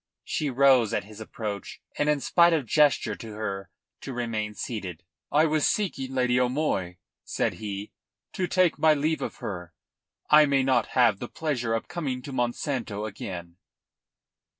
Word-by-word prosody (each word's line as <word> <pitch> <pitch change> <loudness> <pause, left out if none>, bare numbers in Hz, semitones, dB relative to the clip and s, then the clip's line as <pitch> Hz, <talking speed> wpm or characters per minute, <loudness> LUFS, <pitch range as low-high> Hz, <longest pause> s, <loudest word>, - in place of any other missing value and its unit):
She 150 - -2
rose 130 -4 +4
at - - -1
his 105 +1 -13
approach 105 -3 -6 0.2
and 145 - +1
in 150 -2 +2
spite 170 +3 +4
of 155 -5 +1
gesture 140 -4 +3
to 110 -2 -8
her 100 -3 -4 0.3
to 135 - -7
remain 110 -3 -3
seated. 95 -8 -5 0.3
"I 150 +2 +5
was 155 -1 +2
seeking 135 -11 -1
Lady 125 -1 +2
O'Moy," 125 - 0 0.3
said - - -1
he, 100 -1 -5 0.4
"to 185 - -1
take 185 -1 +2
my 155 -1 +5
leave 155 +2 0
of - - -4
her. 90 -4 -7 0.5
I 150 0 +7
may 140 -1 +3
not 130 -4 +2
have 115 -6 +4
the 120 - -6
pleasure 125 -8 -1
of 115 - -3
coming 135 -7 -3
to 140 - -7
Monsanto 120 -4 -2
again." 90 -5 -7
125 Hz, 160 wpm, -27 LUFS, 105-145 Hz, 0.5 s, I